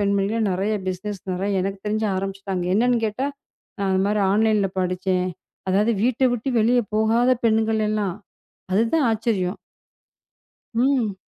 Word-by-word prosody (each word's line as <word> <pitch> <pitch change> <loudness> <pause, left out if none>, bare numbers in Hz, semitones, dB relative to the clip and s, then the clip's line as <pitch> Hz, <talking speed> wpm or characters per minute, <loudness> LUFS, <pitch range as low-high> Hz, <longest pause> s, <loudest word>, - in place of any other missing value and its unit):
பெண்மகள் 200 +2 +1
நிறைய 190 +4 0 0.2
பிஸ்னெஸ் 190 +2 -4
நிறைய 195 +1 0
எனக்குத் 195 +1 -4
தெரிஞ்சு 215 +1 0
ஆரம்பிச்சிட்டாங்க. 195 -1 -3
என்னன்னு 240 +3 +3
கேட்டா 220 +6 -2 0.5
நான் 200 -1 -1
அந்த 190 0 +2
மாரி 210 0 +1
ஆன்லைன்ல 210 -2 +2
படிச்சேன். 185 0 0 0.4
அதாவது 210 +5 +3
வீட்ட 250 +2 +1
விட்டு 240 +2 -4
வெளிய 240 +3 +4 0.2
போகாத 225 +3 +3 0.2
பெண்கள் 220 0 +2
எல்லாம். 205 -4 -1 0.6
அதுதான் 230 +9 +2
ஆச்சரியம். 215 -4 -1 1.1
ம். 240 -3 +1
210 Hz, 130 wpm, -23 LUFS, 195-225 Hz, 1.1 s, வெளிய